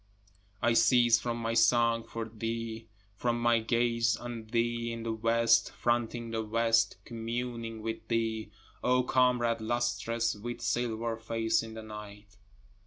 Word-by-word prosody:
I 115 0 +4
cease 115 0 +5
from 120 0 -3
my 115 0 -2
song 115 -1 +4
for 115 0 -5
thee, 115 0 -5 0.3
From 120 +3 -1
my 120 -1 +3
gaze 115 0 +1
on 120 -2 -7
thee 115 0 0
in 115 0 -5
the 115 -1 -2
west, 115 +1 +3
fronting 120 -1 -1
the 110 0 -1
west, 115 +1 +2
communing 115 -1 -4
with 115 0 -5
thee, 110 -2 -1 0.3
O 125 0 +3
comrade 125 -3 +2
lustrous 115 0 0
with 120 +3 -6
silver 115 -1 -1
face 115 0 0
in 110 0 -8
the 110 - -7
night. 105 -1 -10
115 Hz, 140 wpm, -30 LUFS, 115-120 Hz, 0.3 s, cease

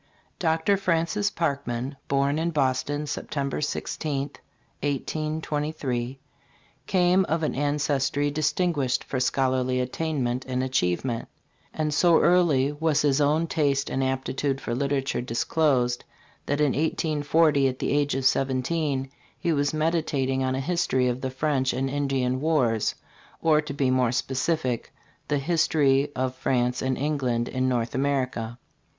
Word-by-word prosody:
DR. 165 +4 +2
FRANCIS 180 +3 +1
PARKMAN, 140 -6 -2
born 140 +2 +1
in 165 +1 0
Boston, 145 0 0
September 140 -1 -3
16 145 -1 -2 0.5
1823, 145 -3 -2 0.7
came 185 0 +3
of 165 0 -1
an 155 - 0
ancestry 145 0 0
distinguished 150 -3 0
for 130 - -3
scholarly 130 0 +1
attainment 130 -2 -1
and 130 0 -1
achievement; 120 -1 -1 0.4
and 155 -1 -1
so 170 +2 +5
early 160 -6 +3
was 150 0 +1
his 145 0 +3
own 150 +3 +3
taste 140 -3 0
and 135 - 0
aptitude 135 +1 -1
for 120 - -4
literature 135 +1 -1
disclosed 125 0 +1 0.4
that 145 +1 0
in 150 -2 +3
1840, 155 -1 +2
at 130 -1 -2
the - - -2
age 145 -1 +1
of 135 -1 -2
seventeen, 135 +1 +1 0.3
he 170 - 0
was 145 -1 +1
meditating 155 -4 0
on 130 0 0
a - - -1
history 130 -4 +1
of 125 +1 -3
the 130 - -2
French 135 -1 0
and 135 +2 -1
Indian 135 -3 0
wars, 130 -9 +1 0.4
or, 155 -2 +3
to 150 -2 -6
be 135 -2 +1
more 130 -2 +2
specific, 130 0 -1 0.4
the 145 - +1
"History 145 -2 +2
of 130 0 -1
France 125 -1 0
and 130 -1 0
Eng 150 +1 -1
land 120 -3 0
in 130 0 0
North 120 -2 -1
America." 130 -4 -1
140 Hz, 135 wpm, -26 LUFS, 130-155 Hz, 0.7 s, so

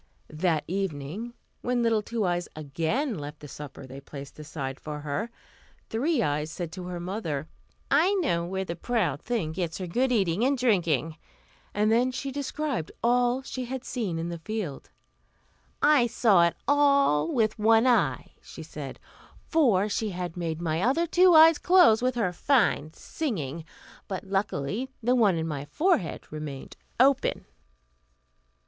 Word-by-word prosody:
That 155 0 0
evening, 190 +5 -4 0.3
when 245 -1 0
little 225 -2 +2
Two 220 0 -2
Eyes 175 -1 -1
again 165 - -2
left 145 +1 -8
the 145 - -10
supper 140 -1 -9
they 135 +2 -10
placed 140 +1 -10
aside 140 -3 -5
for 150 -1 -6
her, 150 +11 -3 0.6
Three 255 +3 +1
Eyes 150 0 -1
said 170 0 -5
to 180 0 -7
her 180 -1 -5
mother, 170 -6 -4 0.4
"I 340 +8 +4
know 275 - +1
where 190 +2 -3
the 170 - -4
proud 175 - -1
thing 220 -10 -2
gets 165 -1 -3
her 185 - -4
good 250 +9 0
eating 195 -3 +1
and 275 +2 +2
drinking;" 170 - +1 0.5
and 210 +1 +1
then 245 +3 +3
she 270 +2 -4
described 280 - -3
all 245 +2 +2
she 255 -1 -5
had 260 +1 -5
seen 210 -12 -3
in 165 +1 -3
the 170 -1 -5
field. 185 -5 -5 0.9
"I 290 -5 +5
saw 205 -7 +4
it 170 - -3
all 280 - +3
with 220 -2 +1
one 225 +2 +5
eye," 245 -2 +2
she - - -10
said; - - -8 0.5
"for 230 - +3
she 215 +1 -1
had 180 -3 -5
made 165 -2 -3
my 165 -1 -1
other 270 - +2
two 355 +1 +5
eyes 320 0 +8
close 350 -12 +5
with 255 0 0
her 205 -7 0
fine 200 - +2
singing, 165 - -4 0.4
but 190 -3 -4
luckily 195 - -2
the 245 +2 +3
one 215 -7 +4
in 160 0 -2
my 145 -3 -4
forehead 295 - 0
remained 150 -3 -7 0.2
open." 270 +1 +3
195 Hz, 155 wpm, -27 LUFS, 160-250 Hz, 0.9 s, eyes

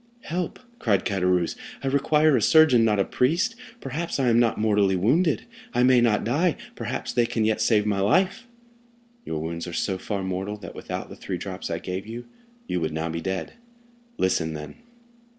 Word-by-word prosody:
"Help!" 175 +1 -3 0.2
cried 100 -4 +1
Caderousse; 90 -3 +1 0.3
"I - - -1
require 150 +2 +3
a 120 - +2
surgeon, 145 -2 +6
not 105 -2 +3
a 100 - +3
priest; 170 - +1 0.3
perhaps 150 +4 -3
I 130 -2 +3
am 115 0 +4
not 120 -2 +2
mortally 105 -3 +2
wounded—I 170 - 0
may 125 -1 +5
not 115 -3 +2
die; 155 +10 +1 0.2
perhaps - - -4
they 120 -1 +2
can 115 -2 0
yet 110 0 +1
save 105 -3 +3
my 100 -2 0
life." 185 - +2 0.8
"Your 80 - -3
wounds 85 +2 -4
are 85 - -6
so 95 +2 -1
far 100 0 -3
mortal 95 +3 -3
that, 90 -5 -9
without - - -6
the - - -9
three - - -5
drops - - -6
I - - -1
gave 95 +3 -5
you, 120 +2 -7 0.4
you 90 - -2
would 80 -1 -2
now 80 +1 -2
be 85 +1 -3
dead. 95 0 -3 0.6
Listen, 80 -4 0
then." 75 0 -8
110 Hz, 185 wpm, -25 LUFS, 95-135 Hz, 0.8 s, surgeon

